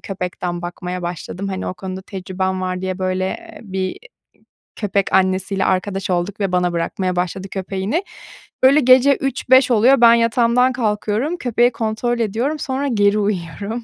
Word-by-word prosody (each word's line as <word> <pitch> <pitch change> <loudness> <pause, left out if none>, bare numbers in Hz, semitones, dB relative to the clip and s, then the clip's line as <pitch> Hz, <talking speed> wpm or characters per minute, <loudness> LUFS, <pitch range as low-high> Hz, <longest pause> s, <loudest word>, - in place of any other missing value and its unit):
köpekten 180 -2 -4
bakmaya 180 +1 -5
başladım. 175 +3 -5
Hani, 190 -1 -4
o - - -3
konuda 190 0 -7
tecrübem 190 0 -3
var 185 0 -3
diye, 185 0 -3
böyle, 185 0 -1
eee, 340 - -7
bir, 190 -3 -6
iii, 185 0 -3 0.8
köpek 200 -2 -1
annesiyle 190 +1 +1
arkadaş 190 +1 -1
olduk 180 +3 -1
ve 195 -2 -1
bana 180 -1 +1
bırakmaya 180 +2 -2
başladı 185 +2 -2
köpeğini. 195 - -2 0.6
Böyle 270 +3 +6
gece 260 +1 +5
03.00-05.00 260 -1 +3
oluyor, 240 +4 +5
ben 235 -1 +8
yatağımdan 235 +2 +3
kalkıyorum, 225 +6 -1
köpeği 245 -2 +2
kontrol 230 +1 -2
ediyorum, 235 +8 -1
sonra 275 +1 -2
geri 205 -3 +2
uyuyorum. 205 +3 -3
200 Hz, 150 wpm, -19 LUFS, 185-240 Hz, 0.8 s, ben